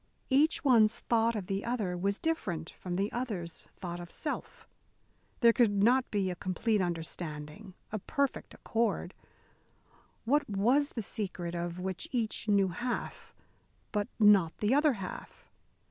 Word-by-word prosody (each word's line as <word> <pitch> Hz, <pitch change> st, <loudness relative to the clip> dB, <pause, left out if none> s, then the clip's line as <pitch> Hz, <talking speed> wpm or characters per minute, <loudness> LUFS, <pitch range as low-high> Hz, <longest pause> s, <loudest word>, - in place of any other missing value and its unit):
Each 295 Hz, +5 st, +3 dB
one's 230 Hz, -6 st, +5 dB
thought 230 Hz, 0 st, +2 dB
of 205 Hz, -4 st, -3 dB
the 195 Hz, +1 st, -2 dB
other 220 Hz, -7 st, -1 dB
was 200 Hz, +3 st, 0 dB
different 180 Hz, -, -2 dB
from 180 Hz, -1 st, -5 dB
the 200 Hz, +3 st, 0 dB
other's 205 Hz, -9 st, -4 dB
thought 175 Hz, -1 st, -6 dB
of 175 Hz, -1 st, -8 dB
self. 300 Hz, -, -5 dB, 0.7 s
There 235 Hz, -1 st, +7 dB
could 205 Hz, -5 st, +3 dB
not 250 Hz, +3 st, +4 dB
be 195 Hz, -3 st, 0 dB
a -, -, -4 dB
complete 200 Hz, +4 st, 0 dB
understanding, 170 Hz, +1 st, -4 dB, 0.2 s
a 215 Hz, -, -2 dB
perfect 280 Hz, +6 st, -2 dB
accord. 220 Hz, -5 st, -1 dB, 1.1 s
What 285 Hz, +3 st, +2 dB
was 245 Hz, +9 st, +2 dB
the 225 Hz, -, -3 dB
secret, 185 Hz, -5 st, -3 dB
of 175 Hz, 0 st, -3 dB
which 185 Hz, 0 st, -4 dB
each 225 Hz, -3 st, -2 dB
knew 200 Hz, -2 st, +4 dB
half, 240 Hz, +7 st, -4 dB, 0.6 s
but 205 Hz, -2 st, 0 dB
not 200 Hz, -6 st, +5 dB
the 210 Hz, +4 st, +1 dB
other 295 Hz, 0 st, +4 dB
half? 195 Hz, -5 st, -8 dB
205 Hz, 145 wpm, -31 LUFS, 180-235 Hz, 1.1 s, There